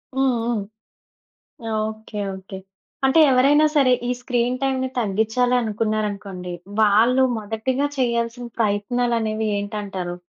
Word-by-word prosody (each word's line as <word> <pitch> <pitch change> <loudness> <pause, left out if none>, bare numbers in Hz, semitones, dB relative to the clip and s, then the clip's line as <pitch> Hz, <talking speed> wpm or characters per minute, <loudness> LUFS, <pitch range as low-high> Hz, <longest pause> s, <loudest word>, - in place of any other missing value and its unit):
హ్మ్, 265 -1 +2
హ్మ్. 235 -3 0 1.3
Okay, 220 -1 -7 0.2
okay. 190 0 -9 0.5
అంటే 265 +5 +3
ఎవరైనా 285 +4 +5
సరే 265 -4 +4 0.2
ఈ - - 0
స్క్రీన్ 245 0 0
టైంని 260 -1 0
తగ్గించాలి 225 +4 +1
అనుకున్నారు 215 0 -1
అనుకోండి, 185 -2 -7 0.3
వాళ్ళు 230 +5 +4
మొదటిగా 225 +6 -1
చేయాల్సిన 235 0 -1
ప్రయత్నాలనేవి 220 +1 0
ఏంటంటారు? 195 -4 -4
225 Hz, 105 wpm, -22 LUFS, 210-250 Hz, 1.3 s, ఎవరైనా